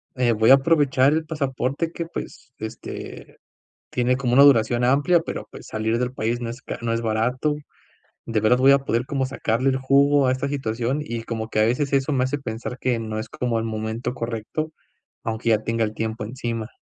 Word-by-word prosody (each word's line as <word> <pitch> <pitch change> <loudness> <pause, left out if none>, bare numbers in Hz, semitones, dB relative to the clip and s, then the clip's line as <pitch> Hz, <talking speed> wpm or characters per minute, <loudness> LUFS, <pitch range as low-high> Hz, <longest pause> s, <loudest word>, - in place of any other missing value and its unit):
Eh, 125 -2 +2
voy 110 +1 +3
a - - +11
aprovechar 140 -2 +3
el 160 0 0
pasaporte 140 0 -2
que, 170 - -4
pues, 165 -5 -8
este, 110 0 -8 0.5
tiene 125 +1 +1
como 130 -2 -1
una 135 +3 +7
duración 120 -3 +5
amplia, 145 +7 +4
pero, 165 - -6
pues, - - -11
salir 110 +1 -1
del 125 0 -1
país 120 -1 -2
no 120 -1 -3
es 125 +2 -9
ca - - -6
no 115 -1 -1
es 115 - 0
barato. 115 +6 0 0.7
¿De 115 -1 -1
verdad 110 +4 +4
voy 135 +2 +6
a 140 - +6
poder 120 -3 -1
como 135 0 -1
sacarle 130 -1 0
el 130 - 0
jugo 140 +1 +4
a 130 - +3
esta 130 +2 -2
situación?". 130 0 -2
Y 115 -5 -5
como 110 -1 -4
que - - -2
a 110 - +5
veces 135 +5 0
eso 140 +2 +2
me 130 -1 +2
hace 140 +3 -1
pensar 120 -1 -5
que 125 -2 0
no 110 -1 -4
es 110 - -5
como 120 -2 -1
el 115 - -2
momento 110 +2 -3
correcto, 120 +6 -4 0.5
aunque 115 -2 -2
ya 110 - +5
tenga 115 0 0
el 105 - -3
tiempo 110 0 -3
encima. 115 -1 -4
125 Hz, 210 wpm, -23 LUFS, 115-135 Hz, 0.7 s, a